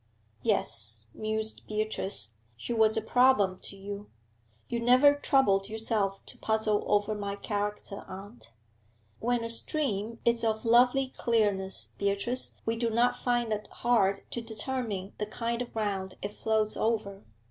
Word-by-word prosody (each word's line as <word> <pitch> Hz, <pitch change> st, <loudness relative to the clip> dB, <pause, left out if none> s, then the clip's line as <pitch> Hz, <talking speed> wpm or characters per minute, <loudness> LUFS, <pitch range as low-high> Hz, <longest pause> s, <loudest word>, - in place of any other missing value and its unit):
'Yes,' 110 Hz, -2 st, 0 dB
mused 220 Hz, 0 st, -2 dB
Beatrice, 210 Hz, -, 0 dB, 0.2 s
'she 240 Hz, -, -4 dB
was 220 Hz, -1 st, +3 dB
a 220 Hz, -, 0 dB
problem 220 Hz, -6 st, +4 dB
to -, -, -7 dB
you. 200 Hz, +1 st, -7 dB, 0.6 s
You 235 Hz, -, -2 dB
never 255 Hz, +5 st, +6 dB
troubled 265 Hz, -9 st, +2 dB
yourself 215 Hz, -3 st, -1 dB
to -, -, -13 dB
puzzle 220 Hz, -1 st, +1 dB
over 205 Hz, +1 st, +2 dB
my 200 Hz, -1 st, -3 dB
character, 205 Hz, -1 st, -3 dB
aunt.' 195 Hz, -, -10 dB, 0.7 s
'When 240 Hz, 0 st, 0 dB
a -, -, -2 dB
stream 230 Hz, -3 st, -1 dB
is 235 Hz, 0 st, +2 dB
of 220 Hz, 0 st, 0 dB
lovely 250 Hz, +3 st, +5 dB
clearness, 205 Hz, -5 st, 0 dB
Beatrice, 200 Hz, +5 st, 0 dB
we 225 Hz, 0 st, 0 dB
do 230 Hz, 0 st, 0 dB
not 240 Hz, +2 st, +3 dB
find 240 Hz, -2 st, 0 dB
it 210 Hz, 0 st, -4 dB
hard 200 Hz, -5 st, +1 dB
to 235 Hz, -, -2 dB
determine 220 Hz, -3 st, -4 dB
the 210 Hz, -, -2 dB
kind 235 Hz, +2 st, -2 dB
of 245 Hz, -, -5 dB
ground 195 Hz, -4 st, -2 dB
it 205 Hz, +1 st, -4 dB
flows 215 Hz, -1 st, 0 dB
over.' 205 Hz, -3 st, -1 dB
220 Hz, 145 wpm, -29 LUFS, 200-235 Hz, 0.7 s, never